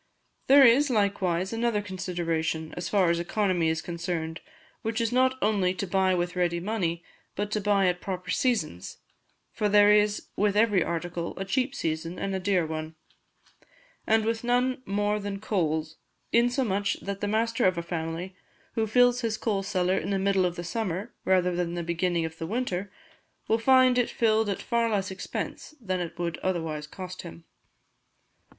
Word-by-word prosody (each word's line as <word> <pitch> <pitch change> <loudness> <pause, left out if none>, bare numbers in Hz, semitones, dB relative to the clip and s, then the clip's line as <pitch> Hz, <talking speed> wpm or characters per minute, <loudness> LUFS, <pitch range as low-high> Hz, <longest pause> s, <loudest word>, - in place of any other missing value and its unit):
There 275 0 +8
is, 265 +5 +5
likewise, 195 -4 0
another 225 -2 0
consideration, 165 -4 -2
as 175 -1 -4
far 190 -5 +3
as 170 - 0
economy 175 -2 +1
is 160 0 -1
concerned, 170 -1 -4 0.4
which 225 0 -2
is 230 0 0
not 260 +1 +3
only 190 -4 +2
to 195 - -3
buy 190 0 +2
with 175 0 -2
ready 175 -1 +1
money, 175 -4 -2 0.3
but 205 +1 -3
to 215 - 0
buy 200 -1 +3
at 180 -1 +1
proper 185 -1 -4
seasons; 195 - -1 0.5
for 210 - 0
there 205 0 +6
is 210 0 +2
with 205 0 +1
every 210 -5 +4
article 170 0 -4
a 195 - -3
cheap 260 +6 0
season 165 -2 -3
and 195 - -3
a 190 - -1
dear 185 -2 +1
one; 155 0 -5 1.1
and 220 0 +3
with 225 0 -1
none 250 +1 +1
more 205 +1 0
than 200 -1 -4
coals, 160 -6 -1 0.4
insomuch 235 -4 +2
that 200 0 -5
the 205 - 0
master 230 +3 +1
of 185 -1 +3
a 170 - -2
family 170 +2 -4 0.4
who 220 -1 0
fills 245 +2 +4
his 225 -2 -1
coal 205 -4 -1
cellar 190 -1 0
in 185 - -5
the 200 - +1
middle 190 -1 +2
of 175 - -5
the 175 - -5
summer, 200 +3 -3
rather 180 -1 +2
than 175 -1 -2
the 175 - -3
beginning 170 0 0
of 160 0 -7
the 165 - -4
winter, 200 -3 -2 0.6
will 225 - +2
find 255 +1 +5
it 245 - +1
filled 220 -2 +2
at 195 - -3
far 235 -1 +1
less 195 -3 -1
expense 195 +9 -6
than 185 -6 -2
it 170 -1 -5
would 170 -2 -3
otherwise 160 -5 -2
cost 185 +2 -8
him. 85 0 -11
190 Hz, 175 wpm, -27 LUFS, 175-220 Hz, 1.1 s, There